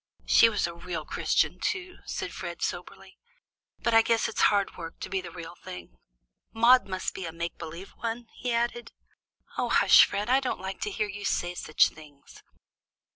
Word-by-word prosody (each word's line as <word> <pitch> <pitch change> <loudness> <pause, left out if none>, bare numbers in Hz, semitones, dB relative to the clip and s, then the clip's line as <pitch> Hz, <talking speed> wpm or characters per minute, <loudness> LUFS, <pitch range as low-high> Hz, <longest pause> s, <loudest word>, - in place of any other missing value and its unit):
"She 230 - +6
was 210 -2 0
a 170 - -4
real 170 -2 -6
Christian, - - 0
too," 365 -1 -3
said - - -4
Fred - - -6
soberly. - - -6 0.6
"But 235 - +1
I 225 - +8
guess 230 0 +1
it's - - -3
hard 200 -2 0
work 165 -2 -8
to - - -5
be 190 -1 0
the 180 - -8
real 170 -1 -9
thing. 85 - -11 0.5
Maude 240 +2 +5
must 185 -1 -3
be 185 - -5
a - - -5
make 170 +1 -5
believe 170 +3 -8
one," 230 +1 -5
he 250 - -4
added. 235 0 -1 0.7
"Oh, - - 0
hush, - - +7
Fred! 205 +2 -3
I 260 +2 +4
don't 265 - -3
like 190 +1 -6
to - - -1
hear 210 +1 -2
you 205 0 -7
say 175 -3 -1
such 155 -3 +3
things." 150 -3 -16
195 Hz, 185 wpm, -28 LUFS, 170-230 Hz, 0.7 s, I